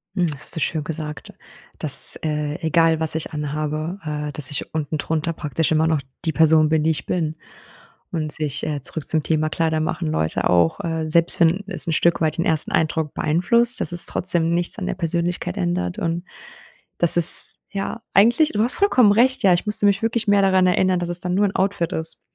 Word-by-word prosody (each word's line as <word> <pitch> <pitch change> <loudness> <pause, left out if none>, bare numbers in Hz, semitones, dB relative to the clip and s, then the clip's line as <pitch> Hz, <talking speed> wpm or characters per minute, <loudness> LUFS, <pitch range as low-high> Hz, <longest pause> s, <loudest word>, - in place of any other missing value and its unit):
Hm, 180 -3 0
hast - - -2
du 160 - -4
schön 155 0 -3
gesagt, 150 -1 -8 0.5
dass, - - +8
äh, 150 -1 -4
egal 160 0 +1
was 160 -1 +1
ich 160 - -5
anhabe, 155 +3 -5
äh, 150 -1 -6
dass 145 -2 0
ich 145 - -4
unten 155 0 -4
drunter 160 +2 -3
praktisch 150 -1 -4
immer 160 +1 +1
noch 160 -3 -1 0.2
die 160 - -2
Person 160 -1 +3
bin, 155 0 -1
die 160 - 0
ich 150 - -6
bin, 160 -3 -3 0.8
und 155 -3 -4
sich 150 -3 -5
äh, 145 -2 -5
zurück 150 +3 -5
zum 155 -3 -1
Thema 155 -1 -1
„Kleider 160 -1 -2
machen 155 - -4
Leute“, 80 0 -2
auch, 85 -2 +1
äh, 160 -1 -4
selbst 170 +1 +2
wenn 170 +4 +1
es 195 - -1
'n 165 - -2
Stück 170 +2 0
weit 160 0 -2
den 170 - -2
ersten 160 -1 +2
Eindruck 160 -1 -2
beeinflusst, 235 +10 +2
dass - - +4
es 175 - +8
trotzdem 170 -2 +1
nichts 175 0 -2
an - - -6
der - - -4
Persönlichkeit 170 - -3
ändert, 90 0 -3
und 170 +1 -4 0.7
das 170 - +4
ist 170 -1 +7 0.2
ja, 200 +3 -6
eigentlich 240 +10 +3
du 210 - -1
hast 240 - -3
vollkommen 255 - +2
recht, 255 +4 +1
ja, 190 -2 +4
ich 175 - -2
müsste 210 0 0
mich 200 -1 +1
wirklich 225 -1 -3
mehr 205 0 +2
daran 190 -1 +2
erinnern, 185 0 0
dass 175 - -5
es 175 0 -3
dann 180 0 -3
nur 205 - +1
'n 195 - -8
Outfit 190 -2 -2
ist. 160 -1 +2
160 Hz, 210 wpm, -20 LUFS, 155-180 Hz, 0.8 s, dass